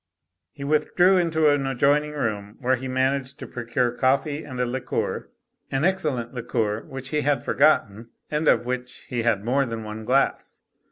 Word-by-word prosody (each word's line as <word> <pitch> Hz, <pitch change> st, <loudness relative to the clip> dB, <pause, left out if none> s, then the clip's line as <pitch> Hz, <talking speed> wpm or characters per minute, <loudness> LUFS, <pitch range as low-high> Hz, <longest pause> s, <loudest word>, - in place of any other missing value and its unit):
He 140 Hz, -, -9 dB
withdrew 175 Hz, +6 st, +3 dB
into 160 Hz, -3 st, +2 dB
an 145 Hz, -2 st, +1 dB
adjoining 145 Hz, +3 st, +2 dB
room 105 Hz, -7 st, -3 dB
where 130 Hz, -1 st, +2 dB
he 130 Hz, +1 st, -6 dB
managed 130 Hz, +1 st, 0 dB
to -, -, -7 dB
procure 120 Hz, 0 st, -1 dB
coffee 140 Hz, +4 st, +1 dB
and 130 Hz, -3 st, -7 dB
a 125 Hz, -, +2 dB
liqueur; 125 Hz, +1 st, -3 dB, 0.4 s
an 135 Hz, +3 st, 0 dB
excel 190 Hz, -6 st, +1 dB
lent 120 Hz, -1 st, -5 dB
liqueur 115 Hz, -3 st, -1 dB
which 135 Hz, 0 st, -7 dB
he 150 Hz, 0 st, 0 dB
had 145 Hz, -1 st, +1 dB
forgotten 115 Hz, -7 st, +2 dB, 0.2 s
and 150 Hz, +1 st, 0 dB
of -, -, +4 dB
which 125 Hz, 0 st, -5 dB
he 120 Hz, -2 st, -1 dB
had 115 Hz, -3 st, +1 dB
more 135 Hz, +4 st, +2 dB
than 115 Hz, -3 st, -4 dB
one 110 Hz, +1 st, -7 dB
glass. 130 Hz, +4 st, 0 dB
130 Hz, 175 wpm, -24 LUFS, 120-145 Hz, 0.4 s, of